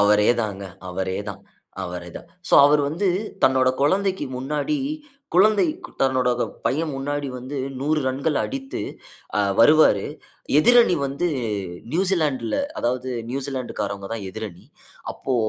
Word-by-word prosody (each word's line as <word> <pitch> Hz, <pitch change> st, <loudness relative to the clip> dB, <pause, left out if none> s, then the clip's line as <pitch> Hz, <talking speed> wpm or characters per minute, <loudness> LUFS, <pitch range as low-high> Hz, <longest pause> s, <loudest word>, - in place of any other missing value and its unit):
அவரே 105 Hz, +1 st, +5 dB
தாங்க 100 Hz, -2 st, -4 dB, 0.3 s
அவரே 95 Hz, +1 st, -2 dB
தான். 100 Hz, 0 st, -10 dB, 0.4 s
அவரே 90 Hz, -1 st, -6 dB
தான். 170 Hz, -, -11 dB, 0.2 s
சோ, -, -, +4 dB
அவரு 150 Hz, +1 st, +4 dB
வந்து 185 Hz, +6 st, 0 dB, 0.3 s
தன்னோட 130 Hz, -1 st, +4 dB
குழந்தைக்கு 190 Hz, +5 st, +1 dB
முன்னாடி, 145 Hz, -, -1 dB, 0.6 s
குழந்தை 205 Hz, +3 st, +5 dB, 0.4 s
தன்னோட 130 Hz, -2 st, +2 dB
த -, -, +3 dB, 0.2 s
பையன் 155 Hz, +3 st, 0 dB
முன்னாடி 145 Hz, +1 st, -2 dB
வந்து 130 Hz, +3 st, -6 dB, 0.2 s
100 150 Hz, +2 st, +1 dB
ரன்கள் 140 Hz, +3 st, 0 dB
அடித்து, 270 Hz, 0 st, -5 dB, 0.6 s
அ -, -, +4 dB, 0.2 s
வருவாரு. 135 Hz, -6 st, +6 dB, 0.5 s
எதிரணி 240 Hz, +3 st, +6 dB
வந்து 140 Hz, +6 st, -2 dB, 0.7 s
நியூசிலேண்ட் 165 Hz, -7 st, +1 dB
ல, -, -, +1 dB, 0.2 s
அதாவது 125 Hz, +2 st, -1 dB, 0.2 s
நியூசிலேண்ட்டுக்காரவங்க 125 Hz, -7 st, -4 dB
தான் 110 Hz, -4 st, -4 dB
எதிரணி. 105 Hz, -5 st, -7 dB, 0.5 s
அப்போ 130 Hz, -, -3 dB
135 Hz, 125 wpm, -23 LUFS, 110-155 Hz, 0.7 s, வருவாரு